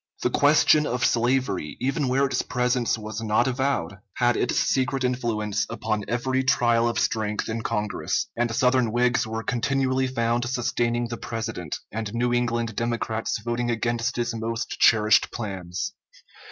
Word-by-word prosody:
The - - +1
question 150 +1 +4
of 125 0 0
slavery, 120 - 0
even 135 +2 0
where 135 +2 +2
its 135 - 0
presence 125 -1 0
was 110 0 -6
not 110 +3 +2
avowed, 130 -9 -1 0.2
had 120 -1 +2
its 125 - 0
secret 135 0 +1
influence 110 -4 -1
upon 110 -2 -2
every 130 +3 0
trial 120 -3 +3
of 115 - -3
strength 105 -1 -1
in 115 +1 -3
Congress, 105 -2 -1
and 120 0 0
Southern 125 0 +2
Whigs 120 0 +2
were 110 +1 -4
continually 130 +2 0
found 120 -1 0
sustaining 120 -1 0
the 120 - -4
President, 110 -10 -4
and 110 0 -4
New 120 +1 +1
England 120 -2 0
Democrats 115 -1 -2
voting 120 0 -1
against 120 +1 -1
his 120 -1 -1
most 115 0 -3
cherished 110 -1 +5
plans. 95 -5 -4
120 Hz, 150 wpm, -25 LUFS, 110-125 Hz, 0.2 s, cherished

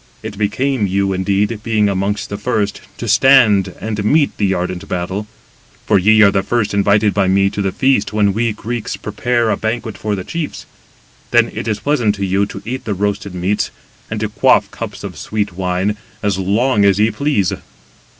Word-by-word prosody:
It 100 - -6
became 110 +3 0
you, 95 +1 0
indeed, 100 +3 0
being 110 -2 +1
amongst 100 +1 -1
the 100 - -3
first, 105 -3 -1 0.2
to 120 - -5
stand 110 -5 +4
and 105 -1 -3
meet 145 +7 +2
the 100 -2 +1
ardent 90 -1 -3
battle. 95 +4 -3 0.6
For 105 -2 +3
ye 110 +4 +5
are 100 - +6
the 95 - +1
first 105 0 -1
invited 100 +1 +3
by 100 -2 +1
me 100 +1 +3
to 100 - -3
the 95 -1 0
feast 130 -5 +1
when 105 -2 +2
we 115 +2 0
Greeks 115 +2 -4
prepare 115 +2 -1
a - - 0
banquet 110 0 -3
for 105 -1 -1
the 95 - -5
chiefs. 165 - -5 0.6
Then - - +3
it - - -5
is 105 -2 -1
pleasant 120 -8 +1
to 100 -1 -2
you 95 +2 +1
to 95 - -9
eat 130 +3 -5
the 105 - -2
roasted 100 0 -2
meats, 95 +3 -1 0.4
and 110 - -3
to 110 - 0
quaff - - +3
cups - - -7
of - - -7
sweet 105 -3 -2
wine, 90 +3 -1 0.3
as 100 -2 0
long 105 +4 +2
as 100 0 +4
ye 110 +1 +3
please. 105 - 0
105 Hz, 190 wpm, -17 LUFS, 100-110 Hz, 0.6 s, are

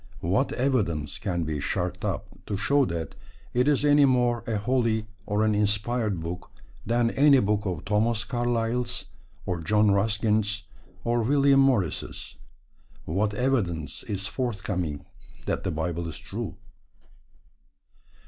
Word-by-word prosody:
What 95 +11 +1
evidence 100 - 0
can 90 -4 -1
be 75 -1 -2
sharked - - -2
up - - -2 0.2
to 100 - -2
show 140 +6 +3
that 85 -5 -4 0.4
it 125 +2 +2
is 145 -1 +3
any 145 -1 +6
more 125 -3 +2
a 110 -2 0
holy 115 -1 +1 0.2
or 105 +1 +2
an 110 - +3
inspired 105 0 +1
book 85 +2 -6 0.3
than 115 +1 +1
any 140 -1 +6
book 105 -1 0
of 90 -5 -3
Thomas 110 +2 +1
Carlyle's, 120 0 -1 0.4
or 90 -2 -2
John 105 +5 +3
Ruskin's, 105 0 +1 0.4
or 120 0 +1
William 140 +3 +4
Morris'? 125 - 0 0.7
What 100 +5 0
evidence 105 - -1
is 100 -1 -4
forthcoming 100 - -3 0.4
that - - -1
the - - -1
Bible 85 +1 -2
is 80 - -6
true? - - -5
105 Hz, 130 wpm, -26 LUFS, 95-120 Hz, 0.7 s, any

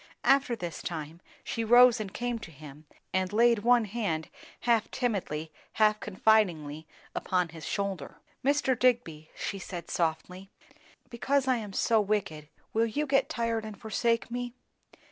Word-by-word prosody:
After 275 -2 +3
this 175 -6 -6
time, 160 0 -6 0.2
she 230 - -3
rose 240 +1 +7
and 205 -3 -5
came 240 +2 -3
to 220 - -9
him 150 0 -13 0.3
and 185 -1 0
laid 235 +1 +4
one 240 +1 +4
hand 200 -7 -2 0.3
half 230 -2 +2
timidly, 185 - -2 0.2
half 215 -1 +3
confidingly, 175 -8 +1 0.3
upon 180 -2 0
his 160 -1 -9
shoulder. 195 -8 -3 0.3
"Mr. 280 -1 +2
Digby," 225 -12 +1
she 200 - -4
said 175 -2 -7
softly, 180 +3 -2 0.6
"because 265 +3 0
I 255 -1 +3
am 210 -3 -6
so 220 +3 +2
wicked, 190 -8 -2 0.2
will 225 +1 +2
you 290 +7 -1
get 275 0 +2
tired 230 -5 -1
and 215 -2 -8
forsake 230 +1 0
me?" 245 0 -4
215 Hz, 145 wpm, -29 LUFS, 170-240 Hz, 0.6 s, rose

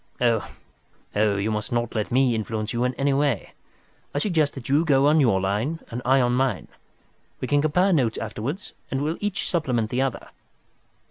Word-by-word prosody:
"Oh, 115 -4 +2 0.7
you 105 0 +1
must 105 -1 -3
not 120 -1 -1
let 110 0 -2
me 130 0 +3
influence 110 0 -3
you 120 +1 0
in 125 0 -1
any 140 0 +1
way. 140 -6 0 0.6
I - - +1
suggest 155 -3 +1
that 135 -4 -8
you 145 +4 +3
go 140 -4 +3
on 150 +2 +5
your 115 -9 +3
line 105 +12 -1
and 120 +2 -4
I 135 +1 +4
on 120 0 +2
mine. 125 -7 0 0.7
We - - -3
can 145 0 +3
compare 180 +6 +3
notes 125 -8 +1
afterwards, 115 - -5 0.2
and 135 - -1 0.2
each 205 -2 -1
will - - -3
supplement 125 -10 0
the 125 - +1
other." 135 -2 -2
125 Hz, 185 wpm, -24 LUFS, 110-145 Hz, 0.7 s, on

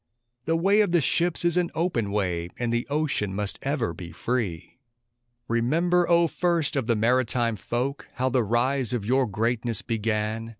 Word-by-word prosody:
The 165 - +1
way 195 +5 +4
of 200 -5 +1
the 175 - +5
ships 170 +4 +1
is 170 0 +2
an 175 -1 +2
open 160 - 0
way, 90 -4 -1
and 120 -1 -1
the 120 0 -1
ocean 140 -10 -1
must 105 0 -3
ever 140 - -1
be 85 +1 -9
free! 105 -6 -3 0.7
Remember, 165 +10 +2
O 170 0 +5
first 170 -1 0
of 135 -5 -1
the 115 - +2
maritime 120 0 +1
folk, 125 +7 -3
how 130 0 0
the 125 -1 +2
rise 125 +3 0
of 115 -5 -2
your 130 +3 +2
greatness 115 +2 0
began. 110 0 -2
120 Hz, 170 wpm, -25 LUFS, 110-155 Hz, 0.7 s, the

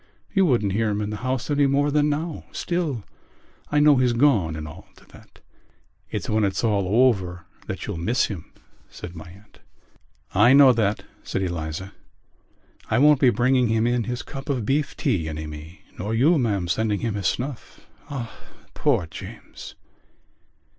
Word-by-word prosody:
You 195 -3 +4
wouldn't 115 -8 +2
hear 110 +1 +1
him 105 0 -1
in 105 0 -3
the 105 - -4
house 130 +3 -3
any 145 -1 +3
more 145 +2 +2
than 150 0 +2
now. 155 +2 -3
Still, 160 - -2 0.7
I 150 - +3
know 145 -1 +6
he's 125 -1 +2
gone 115 - +3
and 75 0 -6
all 75 - -12
to - - -20
that...." - - -18 0.7
"It's - - -4
when 110 0 +1
it's 95 +1 0
all 105 +2 +3
over 90 -7 -2 0.2
that - - -5
you'll - - -4
miss 115 +9 +1
him," 95 -7 -7 0.4
said 85 - -9
my 80 +1 -10
aunt. 100 +4 -18 0.7
"I 110 +7 +6
know 135 -2 +8
that," 110 -3 0 0.2
said 95 - -3
Eliza. 85 +1 -4 1.0
"I - - +2
won't 145 +1 +5
be 130 - +6
bringing 125 +2 +2
him 110 0 +1
in 120 -1 +1
his 125 0 -4
cup 135 +2 -9
of 125 -6 -1
beef 140 +5 0
tea 95 - 0
any 80 0 -5
more, 75 +3 -9 0.2
nor 105 +4 -2
you, 150 +8 +4
ma'am, 100 -7 0
sending 105 +3 0
him 115 -2 -1
his 100 -4 -1
snuff. 130 -1 -5 0.2
Ah, 125 -5 -6 0.4
poor - - +1
James!" 80 - -10
115 Hz, 175 wpm, -24 LUFS, 95-135 Hz, 1.0 s, know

